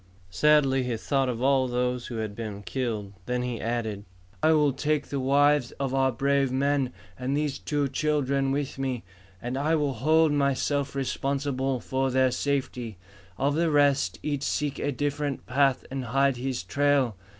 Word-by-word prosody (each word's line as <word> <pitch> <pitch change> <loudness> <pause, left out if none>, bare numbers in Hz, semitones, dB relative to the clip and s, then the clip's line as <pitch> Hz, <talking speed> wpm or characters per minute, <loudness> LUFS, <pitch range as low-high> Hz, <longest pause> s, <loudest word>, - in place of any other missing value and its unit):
Sadly 135 +5 +4
he 125 -2 -2
thought 135 +3 0
of 120 0 -3
all 135 -1 +3
who 125 0 -2
had 110 -2 -3
been 105 -3 -6
killed. 105 0 -3
Then 125 0 -1
he 125 -2 -3
added 110 -3 -2 0.4
"I 160 - +4
will 150 -3 +3
take 150 +2 0
the 140 - -2
wives 140 0 +3
of 135 -1 -3
our 135 -1 +3
brave 140 +1 +1
men 135 0 +1 0.3
and 130 +3 -1
these 150 -2 -1
two 145 -2 -1
children 140 -2 0
with 140 -1 -2
me, 130 -3 -2 0.4
and 120 +2 -3
I 155 +3 +2
will 145 -3 0
hold 155 +5 +3
myself 140 0 0
responsible 135 -1 -1
for 130 +2 -1
their 130 0 +3
safety. 125 -5 -2 0.4
Of 140 +1 +1
the 165 +2 +1
rest, 140 - +3
each 145 -2 -2
seek 145 0 -1
a 145 - -1
different 145 +1 -2
path 135 0 +2
and 135 -1 -3
hide 135 +2 +2
his 125 -5 -3
trail. 140 +1 +1
135 Hz, 165 wpm, -27 LUFS, 125-145 Hz, 0.4 s, Sadly